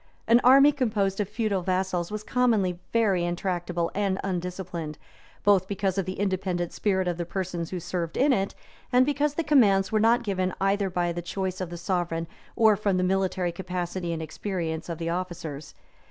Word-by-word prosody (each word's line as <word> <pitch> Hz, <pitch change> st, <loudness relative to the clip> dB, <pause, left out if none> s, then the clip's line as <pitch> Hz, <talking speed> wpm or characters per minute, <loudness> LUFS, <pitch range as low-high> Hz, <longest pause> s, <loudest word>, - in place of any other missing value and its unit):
An 235 Hz, +2 st, +6 dB
army 275 Hz, +3 st, +7 dB
composed 210 Hz, -8 st, 0 dB
of 205 Hz, -2 st, -1 dB
feudal 210 Hz, -3 st, -1 dB
vassals 185 Hz, -1 st, -1 dB
was 215 Hz, 0 st, -4 dB
commonly 215 Hz, -8 st, +1 dB
very 205 Hz, -6 st, +2 dB
intractable 175 Hz, -1 st, -2 dB
and 200 Hz, -1 st, 0 dB
undisciplined, 180 Hz, -4 st, -4 dB, 0.5 s
both 195 Hz, -2 st, +4 dB
because 195 Hz, -1 st, -1 dB
of 190 Hz, -, -2 dB
the 185 Hz, -, -4 dB
independent 185 Hz, -3 st, -1 dB
spirit 190 Hz, -3 st, 0 dB
of 175 Hz, -1 st, -1 dB
the 175 Hz, -, -2 dB
persons 175 Hz, -2 st, -3 dB
who 185 Hz, -, -4 dB
served 175 Hz, -1 st, -4 dB
in 275 Hz, +1 st, +4 dB
it, 195 Hz, -3 st, -1 dB, 0.4 s
and 250 Hz, 0 st, +5 dB
because 290 Hz, +1 st, 0 dB
the 330 Hz, -, 0 dB
commands 205 Hz, -11 st, +4 dB
were 215 Hz, -, +2 dB
not 235 Hz, +3 st, +4 dB
given 185 Hz, -3 st, -1 dB
either 195 Hz, 0 st, +1 dB
by 175 Hz, -1 st, 0 dB
the 175 Hz, +1 st, -4 dB
choice 185 Hz, +1 st, -3 dB
of 185 Hz, -, -3 dB
the 175 Hz, -, -6 dB
sovereign 170 Hz, -2 st, -1 dB, 0.3 s
or 220 Hz, -2 st, +5 dB
from 200 Hz, -2 st, 0 dB
the 185 Hz, -, +1 dB
military 185 Hz, -1 st, 0 dB
capacity 180 Hz, 0 st, -4 dB
and 160 Hz, -1 st, -3 dB
experience 165 Hz, -1 st, -4 dB
of 170 Hz, -, -3 dB
the 165 Hz, 0 st, -3 dB
officers. 170 Hz, -5 st, -5 dB
185 Hz, 185 wpm, -26 LUFS, 175-205 Hz, 0.5 s, army